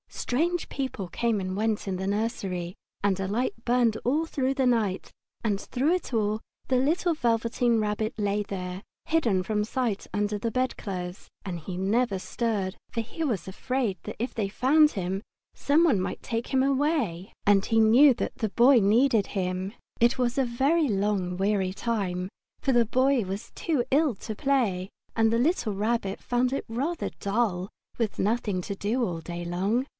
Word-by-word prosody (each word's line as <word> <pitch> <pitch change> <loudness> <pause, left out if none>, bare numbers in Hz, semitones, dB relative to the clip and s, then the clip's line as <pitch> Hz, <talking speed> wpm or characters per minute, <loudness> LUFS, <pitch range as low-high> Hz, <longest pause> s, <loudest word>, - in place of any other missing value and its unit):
Strange 335 +7 -1
people 260 -9 -3
came 230 0 0
and 185 0 -3
went 215 -1 0
in 190 -1 -1
the 190 +1 -3
nursery, 195 -4 -2 0.3
and 195 -2 +2
a 190 - -1
light 240 - 0
burned 240 -2 +3
all 295 +7 +2 0.3
night 230 -7 +1 0.3
and 205 -3 +1
through 275 - 0
it 360 -7 -3
all 215 -1 +1 0.3
the 260 - +3
little 330 +6 +2
Velveteen 235 -3 +1
Rabbit 215 +1 -1
lay 205 -1 0
there, 185 -2 -5 0.2
hidden 230 -13 +2
from 210 +1 0
sight 230 -2 -2
under 205 0 0
the 230 - -1
bedclothes, 195 -7 -3 0.2
and 180 -3 -4
he 180 +3 -6
never 200 +3 +1
stirred, 200 -1 -2
for 230 - -2
he 285 +8 -5
was 220 - -1
afraid 230 +1 -1
that - - -6
if 240 +3 -2
they 215 -3 -1
found 300 +9 +4
him 190 0 -2 0.3
some 295 +4 +3
one 280 - +4
might 185 - -4
take 230 0 -2
him 265 -1 +2
away, 270 - 0
and 200 -1 +4
he 225 - +2
knew 245 +6 +7
that - - -4
the 220 -4 -1
Boy 245 +5 +6
needed 225 +1 +3
him. 185 0 -2 0.3
It 235 +1 +4
was 245 0 0
a 270 - +3
long 215 - +1
weary 195 -1 0
time, 190 -5 -2 0.3
for 270 - +1
the 240 -2 +4
Boy 255 +2 +2
was 195 +4 -6
too 305 -8 0
ill 285 -3 +3
to 215 +3 -6
play, 205 -9 +1 0.3
and 225 -1 +3
the 230 - +2
little 250 - +1
Rabbit 205 -1 -1
found 250 +1 +1
it 275 - -2
rather 280 +9 -2
dull 200 -3 0 0.3
with 225 -3 -1
nothing 205 -3 0
to 200 - -5
do 220 +6 0
all 175 -7 -2
day 175 +1 -6
long. 195 +9 0
220 Hz, 170 wpm, -27 LUFS, 195-255 Hz, 0.3 s, knew